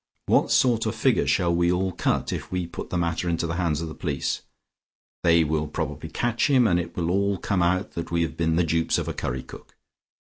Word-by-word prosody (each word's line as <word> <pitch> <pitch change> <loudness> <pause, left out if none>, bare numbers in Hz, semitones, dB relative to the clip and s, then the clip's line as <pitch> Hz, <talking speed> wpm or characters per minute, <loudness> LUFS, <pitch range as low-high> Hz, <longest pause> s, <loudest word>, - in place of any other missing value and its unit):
What - - +3
sort 115 -3 +3
of 110 - -2
figure 130 0 +2
shall 85 -2 +2
we 85 +1 +2
all 95 +1 0
cut - - -1
if - - -6
we 90 -1 -1
put 85 - -7
the 90 - -1
matter 85 +1 -1
into 85 0 0
the 80 +1 -3
hands 85 -4 0
of 85 - -3
the 80 - -7
police? 75 -6 -2 0.8
They 85 -1 +5
will 75 0 -1
probably 75 +1 -4
catch 120 - 0
him, 130 -3 +5
and 90 -5 +3
it 85 0 -6
will 85 -1 0
all 100 +1 +1
come 95 0 -1
out 90 +3 +1
that 85 - -5
we 85 0 +1
have 80 - -4
been 80 -1 +1
the 90 - +3
dupes 80 0 +1
of - - -3
a - - -2
curry 65 +1 -3
cook. - - -13
85 Hz, 235 wpm, -25 LUFS, 80-95 Hz, 0.8 s, They